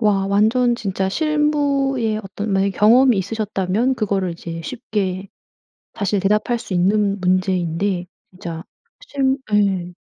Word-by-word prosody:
와 200 -3 +2
완전 225 +5 +3
진짜 195 -3 -2
실무의 280 -5 0
어떤 200 +1 -5
만약에 195 +1 +2
경험이 240 +4 +5
있으셨다면 210 +3 -1
그거를 195 -6 -1
이제 165 0 -7
쉽게 200 -6 -3 0.7
사실 200 0 -1
대답할 210 +5 +1
수 210 -5 -7
있는 200 +3 +2
문제인데. 185 0 0 0.3
진짜 170 -3 -7 0.4
실 270 - 0 0.2
예. 190 -4 +1
205 Hz, 260 characters per minute, -20 LUFS, 190-240 Hz, 0.7 s, 경험이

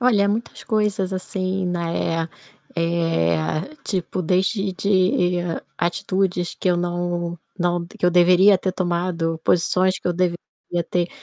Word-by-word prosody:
Olha, 210 -5 +4
muitas 225 +3 -3
coisas, 210 -4 0
assim, 185 0 -2
né, 170 -2 -1 0.5
eh, 165 - +1 0.2
tipo 185 -2 -2
desde 190 +3 +1
de 185 -2 +2 0.4
atitudes 185 0 0
que 185 - +1
eu 175 - +3
não 175 0 -2 0.2
não 175 -1 0
que 205 0 -3
eu 180 - +4
deveria 180 +3 +6
ter 185 - -1
tomado, 175 -2 -1
posições 185 +2 +2
que - - -4
eu 175 - +1
devia 175 0 +1 0.5
ter, 175 -1 +1
180 Hz, 130 wpm, -22 LUFS, 170-190 Hz, 0.5 s, deveria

